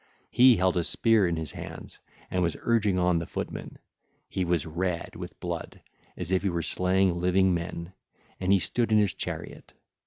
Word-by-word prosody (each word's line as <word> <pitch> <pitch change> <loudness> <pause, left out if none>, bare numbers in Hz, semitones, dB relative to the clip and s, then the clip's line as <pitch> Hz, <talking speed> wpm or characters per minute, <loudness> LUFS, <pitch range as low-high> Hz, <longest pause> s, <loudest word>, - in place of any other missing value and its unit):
He 125 0 +7
held 90 0 +2
a 85 - +2
spear 110 +1 +3
in 85 - 0
his 80 -2 -4
hands - - -9 0.3
and 90 - 0
was 85 -2 0
urging 105 -5 +2
on 90 -1 +2
the 85 - -5
footmen: - - -6 0.5
he 95 - -2
was 85 -4 0
red 85 +1 -3
with - - -8
blood - - -5 0.4
as 85 - -5
if 95 - +2
he 100 - 0
were 85 -2 -2
slaying 90 +2 +1
living 90 +1 +3
men, 85 +1 -4 0.5
and 95 +1 0
he 100 - +6
stood 115 +5 -1
in 110 - +5
his 105 -3 +3
chariot. - - -6
90 Hz, 185 wpm, -27 LUFS, 85-95 Hz, 0.5 s, He